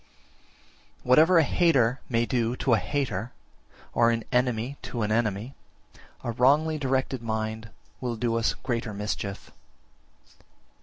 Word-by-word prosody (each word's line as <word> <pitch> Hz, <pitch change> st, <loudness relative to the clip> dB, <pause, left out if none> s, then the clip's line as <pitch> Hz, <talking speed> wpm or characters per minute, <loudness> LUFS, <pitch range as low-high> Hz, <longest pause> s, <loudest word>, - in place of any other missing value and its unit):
42. -, -, -10 dB
Whatever 160 Hz, +7 st, +6 dB
a 165 Hz, -, +6 dB
hater 135 Hz, -6 st, +2 dB
may 115 Hz, -1 st, +1 dB
do 120 Hz, -1 st, 0 dB
to 130 Hz, -1 st, +1 dB
a 110 Hz, -, +4 dB
hater, 120 Hz, +1 st, -2 dB, 0.6 s
or 115 Hz, 0 st, +4 dB
an 115 Hz, -1 st, 0 dB
enemy 125 Hz, +1 st, 0 dB
to 120 Hz, -3 st, -4 dB
an 105 Hz, -, -1 dB
enemy, 110 Hz, +2 st, -1 dB, 0.7 s
a 120 Hz, -, -2 dB
wrongly 145 Hz, +6 st, +3 dB
directed 130 Hz, -2 st, -1 dB
mind 110 Hz, 0 st, -3 dB, 0.3 s
will 120 Hz, -2 st, -3 dB
do 115 Hz, 0 st, -1 dB
us 115 Hz, 0 st, +1 dB
greater 115 Hz, -4 st, -2 dB
mischief. 100 Hz, -1 st, -4 dB
120 Hz, 135 wpm, -26 LUFS, 110-130 Hz, 0.7 s, Whatever